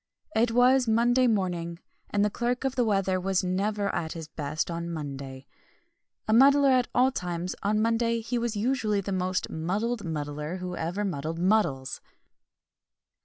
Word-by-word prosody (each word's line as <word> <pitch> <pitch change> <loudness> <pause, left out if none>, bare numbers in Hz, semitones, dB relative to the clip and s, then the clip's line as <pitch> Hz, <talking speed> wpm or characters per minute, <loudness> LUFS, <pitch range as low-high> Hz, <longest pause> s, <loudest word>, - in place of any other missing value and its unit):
It 230 +2 +3
was 250 +2 +4
Monday 240 +3 +3
morning, 175 -6 -1 0.3
and 205 0 +2
the 210 - 0
Clerk 245 +3 -1
of 270 -1 0
the 245 - +2
Weather 195 -4 +1
was 190 0 0
never 200 +3 -1
at 160 -1 -2
his 160 -2 -7
best 155 +1 -3
on 170 0 -4
Monday. 140 -4 -6 0.8
A 215 - +2
muddler 275 +3 +6
at 255 -1 +3
all 255 +2 +4
times, 180 -4 -3
on 210 +1 +1
Monday 230 0 +1
he 235 +2 -2
was 235 -1 -2
usually 215 -2 0
the 195 - -5
most 185 0 -1
muddled 205 +8 -2
muddler 150 0 -4
who 180 -1 -5
ever 175 +6 -2
muddled 160 -3 -3
muddles! 170 -8 +1
195 Hz, 160 wpm, -27 LUFS, 170-230 Hz, 0.8 s, muddler